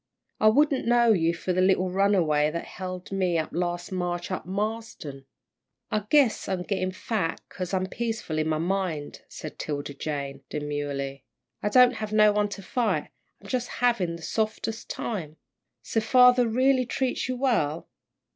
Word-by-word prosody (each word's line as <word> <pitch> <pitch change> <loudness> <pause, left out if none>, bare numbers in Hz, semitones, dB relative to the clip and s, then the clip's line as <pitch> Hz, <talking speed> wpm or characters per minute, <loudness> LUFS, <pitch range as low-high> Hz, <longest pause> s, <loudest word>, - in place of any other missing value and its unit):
"I 215 - +5
wouldn't 275 +3 +3
know 235 -1 +5
you 165 -4 +2
for 180 +2 -2
the 185 - +2
little 185 -1 +3
runaway 180 -6 +3
that 170 +2 -4
held 185 -1 -7
me 185 -3 +1
up 160 - -2
last 175 +1 -2
March 175 -1 -2
out 185 - -1
at - - -27
Marsden." 200 -9 -4 0.7
"I 210 -1 0
guess 280 -7 +3
I'm 185 -2 -1
gettin' 185 -1 -1
fat 185 -3 -2
'cause 185 -2 -5
I'm 185 -1 0
peaceful 225 -7 -3
in 155 - 0
my 155 - +1
mind," 170 -3 -2
said 155 - -8
'Tilda 145 -1 -4
Jane, 140 -1 -4
demurely; 145 -2 -3 0.4
"I 210 - 0
don't 250 +2 +6
have 215 -1 -4
no 215 0 +6
one 205 0 +1
to 200 -1 -7
fight. 235 +3 -1 0.3
I'm - - -11
jus' 250 -2 -1
havin' 230 -9 0
the 170 - -11
softest 220 +2 -2
time!" 160 -9 -4 0.5
"So 225 - 0
father 250 +1 +6
really 255 +2 +3
treats 255 -1 -1
you 255 - 0
well?" 215 - 0
190 Hz, 165 wpm, -26 LUFS, 165-225 Hz, 0.7 s, don't